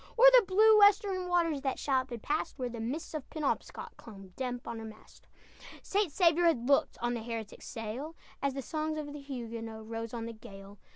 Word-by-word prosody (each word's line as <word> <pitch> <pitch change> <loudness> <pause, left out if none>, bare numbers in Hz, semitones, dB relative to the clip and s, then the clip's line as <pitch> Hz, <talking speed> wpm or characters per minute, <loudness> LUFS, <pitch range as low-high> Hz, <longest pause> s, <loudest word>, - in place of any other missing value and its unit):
O'er 480 - +7
the 460 - -3
blue 430 +3 +6
western 405 -3 +4
waters 335 -5 +1
That 270 -1 -1
shallop 260 -2 0
had 235 -3 -7
passed, 300 0 -2
Where 250 -2 -2
the 235 -1 -7
mists 260 +10 -4
of 305 -4 -5
Penobscot 305 -4 -3
Clung 195 -4 -12
damp 250 -2 -4
on 230 -1 -5
her - - -7
mast. 220 -1 -13 0.6
St. 400 -4 0
Saviour 340 +1 +4
had 245 -7 +1
looked 280 0 +3
On 240 0 +1
the 235 - -3
heretic 225 -2 -6
sail, 250 +7 -6 0.3
As 275 -1 0
the 275 - -4
songs 310 +3 -2
of 290 -1 -5
the 295 - -8
Huguenot 230 -5 -6
Rose 225 0 -5
on 230 -2 -4
the 230 - -6
gale. 200 -3 -12
265 Hz, 205 wpm, -31 LUFS, 230-320 Hz, 0.6 s, O'er